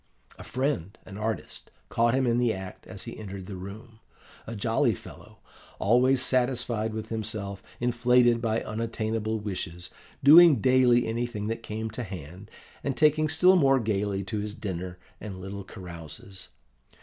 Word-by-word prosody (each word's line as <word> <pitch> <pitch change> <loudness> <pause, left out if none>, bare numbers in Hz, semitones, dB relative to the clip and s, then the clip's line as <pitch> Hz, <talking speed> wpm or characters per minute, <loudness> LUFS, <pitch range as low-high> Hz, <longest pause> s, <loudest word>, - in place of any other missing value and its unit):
A - - -8
friend, 125 - -2
an 100 - -10
artist, 110 -2 -4 0.2
caught 115 +1 +2
him 130 0 +2
in 120 0 +2
the 120 -2 +3
act 95 -3 -7
as - - -7
he - - -7
entered 100 -3 -7
the 95 - -7
room 105 +5 -10 0.5
a 115 - -5
jolly 115 +2 +1
fellow, - - -13 0.4
always 125 +5 +3
satisfied 125 -3 0
with 110 - -5
himself, 105 -3 -4 0.2
inflated 120 0 +3
by 115 -1 0
unattainable 110 0 -2
wishes, 90 -4 -5 0.3
doing 160 +2 +9
daily 125 0 +4
anything 115 -2 -2
that 115 0 -3
came 110 0 -4
to 115 - -5
hand, 95 -1 -8 0.3
and 135 -2 -2
taking 155 0 +4
still 180 +5 +5
more 135 -6 +4
gaily 100 -3 -1
to 100 +3 -3
his 105 0 -4
dinner 90 -2 -5 0.2
and 100 -3 -7
little 95 +1 -6
carouses. 90 -1 -10
110 Hz, 150 wpm, -27 LUFS, 100-125 Hz, 0.5 s, doing